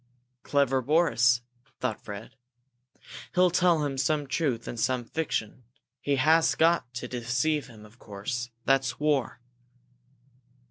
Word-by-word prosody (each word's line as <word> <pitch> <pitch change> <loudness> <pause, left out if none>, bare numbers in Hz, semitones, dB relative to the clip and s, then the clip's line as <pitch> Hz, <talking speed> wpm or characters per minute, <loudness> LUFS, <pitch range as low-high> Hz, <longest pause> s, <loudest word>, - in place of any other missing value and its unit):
"Clever 135 -2 +1
Boris!" 125 -4 +3 0.4
thought - - -2
Fred. 105 +5 -8 1.0
"He'll 180 0 +4
tell 170 -3 +3
him 135 -2 -3
some 150 +1 +1
truth 135 -5 -1
and 120 - -5
some 125 +1 0
fiction! 125 -5 -3 0.4
He 145 - 0
has 160 +4 +4
got 165 -7 +2
to 125 0 -4
deceive 125 +5 -1
him, 110 -4 -14
of 110 +4 -19
course 115 +4 -5 0.2
that's 135 -2 +1
war." 145 -6 0
135 Hz, 125 wpm, -27 LUFS, 120-155 Hz, 1.0 s, He'll